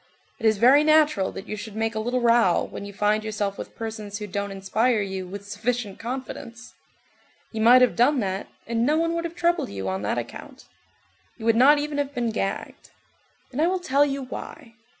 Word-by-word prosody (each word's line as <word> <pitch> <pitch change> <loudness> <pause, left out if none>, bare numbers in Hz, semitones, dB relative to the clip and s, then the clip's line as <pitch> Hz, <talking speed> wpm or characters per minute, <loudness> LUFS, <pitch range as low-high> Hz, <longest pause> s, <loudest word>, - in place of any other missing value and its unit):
It 225 - +2
is 215 -1 +3
very 260 +7 +6
natural 305 -10 +3
that 195 - -9
you 215 - -4
should 215 0 -8
make 225 +1 -1
a 220 - -3
little 245 +3 -1
row 230 -6 +4
when - - -7
you 200 - -8
find 210 +2 +1
yourself 210 -2 -3
with - - -8
persons 215 -2 -6
who 210 - -5
don't 200 0 -3
inspire 215 +5 0
you 190 -2 -4
with 200 +2 -8
sufficient 230 -1 -3
confidence. 240 -1 -7 0.8
You 220 - -3
might 245 +3 +7
have 250 - +2
done 260 +4 +3
that, 190 -1 -3 0.2
and 230 0 -1
no 300 +5 +2
one 330 +1 +1
would 335 0 -2
have 335 0 -6
troubled 345 0 +1
you 95 -1 -5
on 95 +1 -2
that 105 +3 -1
account. 120 0 -7 0.7
You 220 - -8
would 230 -1 +4
not 275 +5 +6
even 290 0 -2
have 285 0 -3
been 240 -2 0
gagged. 195 -2 -4 0.6
And 270 +4 -2
I 330 - +4
will 375 +1 +1
tell 285 -5 +3
you 275 -1 -2
why. 250 -2 -9
230 Hz, 210 wpm, -24 LUFS, 205-270 Hz, 0.8 s, might